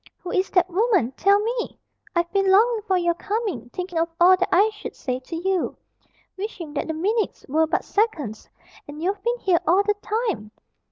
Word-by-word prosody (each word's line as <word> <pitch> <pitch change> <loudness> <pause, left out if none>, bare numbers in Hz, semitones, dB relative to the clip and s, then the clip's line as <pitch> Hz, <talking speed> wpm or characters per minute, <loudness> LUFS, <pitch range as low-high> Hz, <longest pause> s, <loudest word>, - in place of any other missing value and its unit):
"Who 360 - -7
is 375 0 +1
that 360 -2 +3
woman? 375 - +2
Tell 400 +9 +3
me! 465 +3 -3 0.4
I've 345 0 +1
been 390 -1 +2
longing 440 +4 +4
for 380 -2 +3
your 345 -1 +2
coming, 390 - -3
thinking 360 +3 -4
of 335 +1 +1
all 360 +2 +7
that 370 0 -1
I 415 +4 +4
should 420 - -8
say 255 -1 -3
to 265 +6 -8
you, 370 +1 -1 0.6
wishing 375 -6 -6
that 290 - -2
the 320 - -2
minutes 420 +7 -1
were 315 +3 +2
but 320 - -1
seconds 315 - -1 0.4
and 290 +1 -9
you've 390 +2 -1
been 475 +3 0
here 370 -7 +2
all 370 +5 +5
the 415 - +2
time! 425 - -2
375 Hz, 190 wpm, -23 LUFS, 330-415 Hz, 0.6 s, all